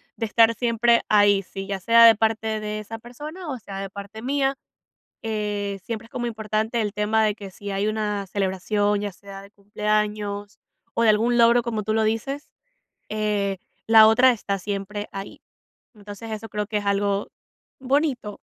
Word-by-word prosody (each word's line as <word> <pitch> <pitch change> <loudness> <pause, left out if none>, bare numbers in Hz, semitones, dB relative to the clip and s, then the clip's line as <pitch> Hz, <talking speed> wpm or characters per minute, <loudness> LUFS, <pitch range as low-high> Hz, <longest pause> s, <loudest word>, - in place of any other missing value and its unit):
de 225 - -2
estar 225 +1 +4
siempre 235 0 +2
ahí, 205 -1 +5
sí, 195 +1 -8
ya 195 -1 -3
sea 230 +4 +6
de 225 - +8
parte 220 0 0
de 215 0 -4
esa 225 +2 -8
persona, 300 +9 -9
o 260 - -3
sea 195 -3 -8
de 195 0 -5
parte 200 +2 -9
mía, 270 +1 0 0.7
eh, 205 -3 -3
siempre 230 -1 -5
es - - -24
como 240 -1 -3
importante 220 +1 -2
el 210 -2 -1
tema, 215 +1 +1
de 210 -1 +1
que 200 -3 -9
si 200 +2 -8
hay 200 +2 0
una 210 -2 -2
celebración, 205 +2 0
ya 205 -1 -4
sea 195 +1 -11
de 200 - -15
cumpleaños 210 0 -2 0.3
o 230 - +1
de 230 - +4
algún 230 +3 +3
logro, 235 +1 +5
como 225 -3 -3
tú 215 +1 -1
lo 220 - +2
dices, 270 +7 -2 0.6
eh, 210 -2 -1 0.3
la 220 -1 +8
otra 250 +4 +6
está 200 -4 -3
siempre 205 +2 -4
ahí. 195 0 -8 0.5
Entonces, 210 +2 -10
eso 220 +1 -6
creo 210 0 -3
que 210 -1 -1
es 205 - -6
algo 200 0 0 0.5
bonito 265 -5 -1
215 Hz, 180 wpm, -24 LUFS, 205-230 Hz, 0.7 s, de